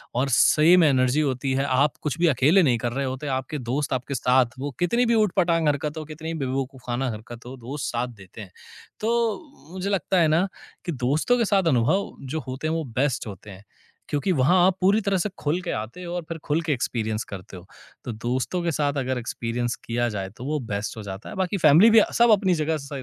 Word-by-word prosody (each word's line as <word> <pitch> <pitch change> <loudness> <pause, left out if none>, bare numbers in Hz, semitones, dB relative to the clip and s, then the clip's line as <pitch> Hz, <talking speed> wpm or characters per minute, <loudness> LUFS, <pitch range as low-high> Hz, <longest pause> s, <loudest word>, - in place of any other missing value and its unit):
और 135 +2 +1
same 160 +8 +5
energy 135 0 +3
होती 135 -1 -1
है। 135 - +1
आप 140 +3 +1
कुछ 150 +2 -2
भी 175 - +4
अकेले 155 +6 +4
नहीं 125 -6 +3
कर 120 0 -3
रहे 140 +1 -1
होते, 130 +3 -4
आपके 130 +3 -4
दोस्त 130 +4 -2
आपके 130 +2 -3
साथ 125 0 +2
वो 145 +1 -3
कितनी 235 +8 +2
भी 235 - +2
उटपटांग 170 -4 +1
हरकत 150 +2 -1
हो, 155 - -5
कितनी 160 +2 -6
भी 160 - -5
बेवकूफाना 130 -1 -3
हरकत 115 +2 -10
हो, 130 - -8
दोस्त 130 +4 -6
साथ 120 +1 -1
देते 95 +3 -12
हैं। 95 -4 -11 0.5
तो 235 - -2
मुझे 190 +2 -4
लगता 190 -1 +1
है 160 - +4
ना 185 - +2 0.4
कि 175 - -2
दोस्तों 145 - +1
के 230 - +2
साथ 195 - +4
अनुभव 155 +13 +1 0.2
जो 160 - -1
होते 130 +4 -4
हैं 160 - 0
वो 165 - -1 0.2
बेस्ट 135 -4 0
होते 100 +1 -9
हैं। 95 +1 -13 0.5
क्योंकि 150 +6 0
वहाँ 145 +9 +4
आप 190 0 +1
पूरी 200 +4 +4
तरह 200 -2 0
से 200 +4 -1
खुल 155 +5 0
के 180 - -4
आते 115 +12 -8
हो 175 0 -6
और 175 - -3
फिर 165 - -4
खुल 155 +3 +1
के 160 -2 0
एक्सपीरियंस 110 -3 -2
करते 95 -1 -8
हो। 90 - -12 0.4
तो 120 - -3
दोस्तों 125 +10 -2
के 170 - 0
साथ 145 -1 0
अगर 130 -1 -1
एक्सपीरियंस 120 0 -3
किया 120 +1 0
जाए 95 -1 -3
तो 125 - -8
वो 150 +1 -1
बेस्ट 100 +2 -3
हो 110 - -6
जाता 100 +1 -8
है। - - -8
बाकी 190 0 -1
फैमिली 165 +6 +6
भी 225 - +8
अ, - - +1
सब 235 -1 +6
अपनी 195 -3 +4
जगह 160 +1 0
स 140 - -10
145 Hz, 230 wpm, -24 LUFS, 125-175 Hz, 0.5 s, भी